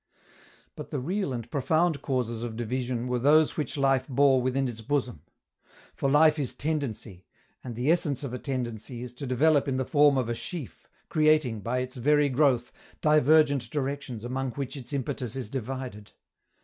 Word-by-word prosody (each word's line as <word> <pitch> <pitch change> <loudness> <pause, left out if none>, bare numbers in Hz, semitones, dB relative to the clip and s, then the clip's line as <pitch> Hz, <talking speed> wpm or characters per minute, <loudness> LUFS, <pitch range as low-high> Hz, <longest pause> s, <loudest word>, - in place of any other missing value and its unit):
But - - -8
the 145 - -3
real 185 +4 -2
and 120 -2 -4
profound 155 +2 +1
causes 120 -4 -2
of 120 -2 -5
division 120 +1 -2
were 125 0 0
those 150 +4 +4
which 150 -1 -3
life 135 -2 +2
bore 135 -1 +4
within 130 +1 0
its 115 -2 -6
bosom. 125 - -2 0.7
For 135 - -1
life 150 +2 +5
is 135 -4 -2
tendency, 130 - -4 0.4
and 120 -3 -6
the 125 +7 +1
essence 150 -6 0
of 130 -3 -5
a 125 - -4
tendency 120 -2 -4
is 125 -1 -8
to 135 +2 -7
develop 145 +3 +3
in 130 -1 0
the 130 - -1
form 145 0 +4
of 125 -3 0
a 120 - -1
sheaf, 145 +3 -7 0.2
creating, 155 -7 +2
by 120 +5 -1
its 130 0 -6
very 145 +3 +3
growth, 130 -3 +2 0.3
divergent 150 -4 +4
directions 135 -4 -4
among 130 0 -3
which 140 0 -5
its 130 -2 -8
impetus 130 -3 -3
is 125 -6 -5
divided. 130 -4 -6
130 Hz, 175 wpm, -27 LUFS, 120-145 Hz, 0.7 s, life